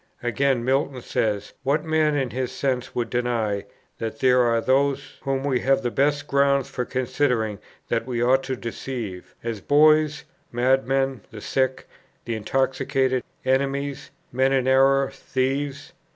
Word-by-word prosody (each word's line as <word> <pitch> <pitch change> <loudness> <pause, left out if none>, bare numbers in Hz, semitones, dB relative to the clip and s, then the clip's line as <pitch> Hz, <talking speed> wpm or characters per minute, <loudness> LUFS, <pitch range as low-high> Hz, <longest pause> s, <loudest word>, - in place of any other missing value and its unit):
Again, 125 0 +1
Milton 135 -1 0
says: 105 -2 -1
"What 145 +3 +1
man 155 -2 +2
in 135 -4 -1
his 130 -1 -2
senses 130 -3 -2
would 115 -2 -2
deny, 115 -5 -1 0.3
that 115 -1 -4
there 125 -1 +4
are 115 -1 +3
those 135 +3 0
whom 135 -1 -1
we 135 -3 +1
have 135 +2 +2
the 120 - -1
best 145 +2 +1
grounds 140 -1 +2
for 125 - -3
considering 125 -5 0 0.3
that 115 +1 -1
we 120 -2 -2
ought 130 +3 +3
to 130 - -2
deceive, 115 -5 -6
as 115 -3 -4
boys, 155 +2 +4 0.3
madmen, 135 +1 +1
the 110 - -9
sick, 130 +4 -1 0.4
the 115 - -2
intoxicated, 130 +2 0 0.2
enemies, 140 +1 -1 0.2
men 130 +2 +2
in 130 -1 +1
error, 135 +1 +4
thieves? 135 +1 -2
130 Hz, 145 wpm, -24 LUFS, 120-140 Hz, 0.4 s, there